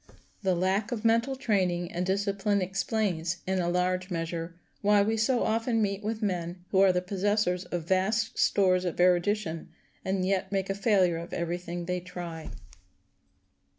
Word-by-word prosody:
The 190 -3 +1
lack 190 +5 0
of 230 -2 -3
mental 230 +4 +3
training 185 -8 0
and 175 - -2
discipline 200 +1 0
explains, 185 -2 -1
in 190 0 0
a 175 -1 0
large 180 +1 0
measure, 165 -1 -4 0.3
why 205 0 +4
we 220 +2 +1
so 235 +3 +2
often 225 +1 +1
meet 200 -1 -1
with 220 +1 -3
men 175 -2 -3
who 190 - +3
are 195 -1 +6
the 180 0 -1
possessors 190 -1 0
of 175 -2 -4
vast 200 +4 +1
stores 185 -2 +3
of 175 -2 -3
erudition, 180 -1 +1 0.3
and 190 -1 0
yet 190 0 0
make 195 -1 -1
a - - +1
failure 195 -4 +2
of 170 +1 -7
every 170 +1 -2
thing 175 0 -5
they 180 +1 -1
try. 175 -3 -7
190 Hz, 165 wpm, -28 LUFS, 175-205 Hz, 0.3 s, are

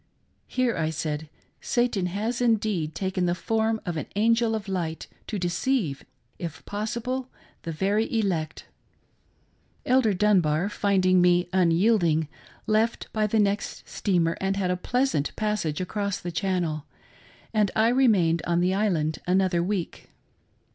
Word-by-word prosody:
Here, 255 -2 0
I 160 -1 0
said, 155 -1 -3 0.3
Satan 240 -7 0
has 220 +7 -2
indeed 210 -9 +1
taken 190 -2 -1
the 175 - +1
form 220 +4 0
of 175 -3 -3
an 155 - -4
angel 230 +1 +2
of 215 -2 -5
light 170 -4 -3 0.2
to 215 - -3
deceive, 180 - -1 0.4
if 165 -2 -6
possible, 235 +5 -3 0.3
the 165 - -5
very 200 +7 0
elect. 170 -8 -1 1.2
Elder 245 -5 +3
Dunbar 180 -3 +2
finding 185 -3 +2
me 175 0 +4
unyielding, 170 -3 +3 0.4
left 220 +2 0
by 215 -1 +1
the 220 - 0
next 205 0 -1
steamer 170 -5 0
and 195 0 0
had 185 -2 0
a - - +1
pleasant 245 - 0
passage 210 -8 -1
across 200 +1 -2
the 175 - -5
Channel, 170 -3 -1 0.7
and 210 -2 +3
I 220 +1 +4
remained 205 -11 +3
on 170 0 +2
the 180 +2 +2
island 175 -7 0
another 185 -1 +2
week. 185 -1 -3
195 Hz, 135 wpm, -26 LUFS, 170-220 Hz, 1.2 s, me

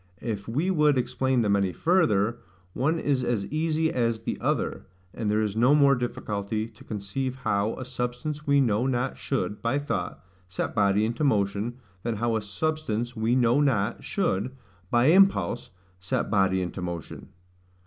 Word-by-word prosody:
If 105 -4 -4
we 150 +11 0
would 150 -5 +3
explain 125 0 +1
them 100 -1 +3
any 100 -2 +1
further, 120 - +2 0.3
one 155 +6 +1
is 140 -5 0
as 115 -5 0
easy 160 0 +1
as 115 -2 0
the - - -2
other; - - -1 0.3
and 110 -3 -2
there 105 +1 +2
is 105 -1 -2
no 125 +6 +5
more 140 -2 +5
difficulty 110 -3 -2
to 115 -2 -17
conceive 110 +6 -4
how 110 -3 0
A 130 - -6
SUBSTANCE 130 +5 -4
WE 140 0 +4
KNOW 120 0 +1
NOT 130 0 -1
should, 130 -6 -2
by 115 +4 +1
thought, 145 - -3 0.2
set 90 - -3
body 100 0 +3
into 115 +6 -2
motion, 105 -2 0 0.2
than 115 +1 -2
how 115 +1 0
A 110 - 0
SUBSTANCE 120 0 -2
WE 115 +2 +1
KNOW 125 +1 +3
NOT 115 -6 +1
should, 130 - -1 0.3
by 120 +1 +3
impulse, 175 - +4 0.3
set 90 -1 -2
body 95 -2 +2
into 90 +1 -5
motion. 85 -4 -6
120 Hz, 165 wpm, -26 LUFS, 105-135 Hz, 0.3 s, no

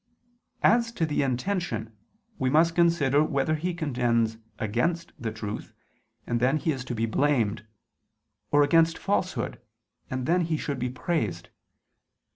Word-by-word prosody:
As 235 0 +4
to 165 - 0
the 150 -2 0
intention, 135 - -2 0.4
we 130 - +1
must 165 +4 +4
consider 160 -5 +3
whether 140 0 0
he 170 +3 -2
contends 120 -7 0 0.2
against 165 +11 -1
the 115 -3 -3
truth, 110 -1 -6 0.5
and 120 - 0
then 130 +5 +3
he 160 +2 0
is 130 -3 -4
to 125 - -4
be 115 +1 0
blamed, 115 -3 +1 0.8
or 145 0 +5
against 165 +3 +4
falsehood, 185 - -1 0.5
and 130 -1 -3
then 175 +4 +3
he 165 -2 0
should 140 -3 -3
be 125 - -1
praised. 115 - -2
140 Hz, 140 wpm, -27 LUFS, 120-165 Hz, 0.8 s, or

